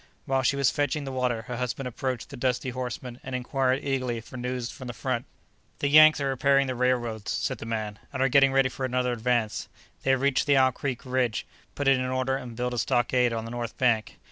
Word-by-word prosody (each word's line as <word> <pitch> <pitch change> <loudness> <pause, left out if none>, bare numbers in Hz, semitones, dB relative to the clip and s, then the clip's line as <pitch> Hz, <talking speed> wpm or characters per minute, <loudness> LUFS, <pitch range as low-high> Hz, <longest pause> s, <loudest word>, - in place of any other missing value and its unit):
While 135 0 +1
she 130 +2 +2
was 140 -2 +3
fetching 145 +1 -1
the 135 - -5
water 125 -3 -1
her 120 +1 -5
husband 125 +1 -3
approached 130 +1 -4
the - - -7
dusty 125 0 -1
horseman 125 0 -5
and 130 -1 -5
inquired 130 +1 0
eagerly 130 -4 -1
for 115 - -12
news 125 -1 -3
from 130 - -9
the 120 - -6
front. 125 -2 -2 0.5
"The 140 - 0
Yanks 155 +1 +8
are 140 -1 0
repairing 140 +1 +3
the 130 - -2
railroads," 120 -4 0
said - - -2
the 110 - -7
man, 110 -2 -3
"and 135 - -5
are 135 - +4
getting 135 0 +5
ready 135 0 +4
for 130 - -7
another 125 -1 0
advance. 120 -2 0 0.3
They - - -2
have 135 -1 +3
reached 140 0 +2
the 140 -1 +5
Owl 130 -1 +5
Creek 130 0 -4
bridge, 125 -3 0 0.3
put 145 - -2
it 135 -1 +5
in 130 - -1
order 130 +1 0
and 125 -3 -6
built 125 +1 -2
a 120 - -1
stockade 125 0 +2
on 115 -1 -3
the 115 - -7
north 120 -2 -5
bank. 120 -4 +1
125 Hz, 230 wpm, -27 LUFS, 120-135 Hz, 0.5 s, Yanks